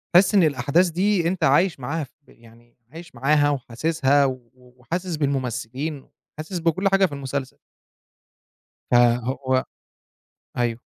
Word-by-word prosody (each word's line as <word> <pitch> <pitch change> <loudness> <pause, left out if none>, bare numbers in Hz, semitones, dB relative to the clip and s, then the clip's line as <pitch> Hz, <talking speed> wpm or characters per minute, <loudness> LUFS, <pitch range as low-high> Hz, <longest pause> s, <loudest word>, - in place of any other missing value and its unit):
تحس 195 +3 +6
إن 190 - +6
الأحداث 150 +5 +2
دي 180 0 +1
أنت 180 -2 -2
عايش 155 +3 +3
معاها، 150 +5 -3
في 135 - -12
ب - - -28
يعني 115 +1 -21
عايش 165 -2 -12
معاها، 145 +3 +2
وحاسسها، 140 +2 +1
و 135 - +1 0.2
و 125 -1 -22
وحاسس 175 +6 -4
بالممثلين، 135 0 -3 0.3
حاسس 165 +3 -5
بكل 170 +4 +1
حاجة 195 0 +4
في 170 - -4
المسلسل. 135 -1 -5 1.3
ف - - +2 0.3
هو 130 0 -1 0.9
أيوة. 120 -1 -1
145 Hz, 135 wpm, -23 LUFS, 130-170 Hz, 1.3 s, تحس